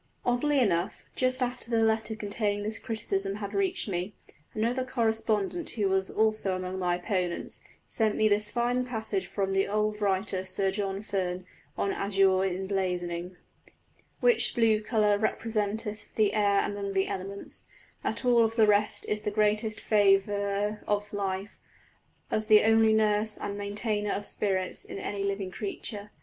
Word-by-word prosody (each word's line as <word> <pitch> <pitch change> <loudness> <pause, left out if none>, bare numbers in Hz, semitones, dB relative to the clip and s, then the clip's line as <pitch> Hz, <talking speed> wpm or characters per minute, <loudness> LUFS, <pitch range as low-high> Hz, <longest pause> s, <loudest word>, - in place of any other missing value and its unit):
Oddly 275 +4 +2
enough 190 -3 0
just 255 0 +2
after 245 -1 -4
the 225 -1 +2
letter 220 0 +1
containing 205 -1 -2
this 220 +2 -2
criticism 195 -4 -2
had 205 -1 -6
reached 380 -7 0
me, 185 +1 -3 0.4
another 235 +4 0
correspondent 225 - 0
who 210 -4 0
was 190 0 +1
also 215 -3 +1
among 185 0 -4
my 180 -1 +1
opponents, 180 -1 -2 0.2
sent 220 -2 0
me 215 - +3
this 210 0 +2
fine 245 +2 0
passage 245 - -3
from 195 -1 -2
the 195 0 +2
old 210 +1 -1
writer 190 -1 0
Sir 190 +1 0
John 195 0 -3
Ferne, 185 -3 -2 0.3
on 200 - 0
azure 195 -1 +2
in 190 0 -1
blazoning: 180 -2 -2 0.8
"Which 485 -2 +3
blew 225 -2 +3
colour 210 -2 +2
representeth 215 -1 -2
the 215 -2 +3
Aire 205 -2 +3
amongst 200 -1 -4
the 190 0 +2
elements, 195 +1 -6 0.4
that - - -2
of - - -8
all 235 -2 +5
the 225 0 +3
rest 210 0 +2
is 210 0 -1
the - - -1
greatest 215 +1 +1
favourer 205 0 +2
of 205 0 -1
life, 195 0 -3 0.7
as 215 0 0
the 215 -1 +7
only 225 0 +5
nurse 215 0 +2
and 200 - -4
maintainer 205 +1 -2
of 205 - -3
spirits 190 -3 0
in - - -7
any 200 0 -3
living 200 -1 -2
creature. 205 +1 -5
205 Hz, 155 wpm, -28 LUFS, 195-220 Hz, 0.8 s, the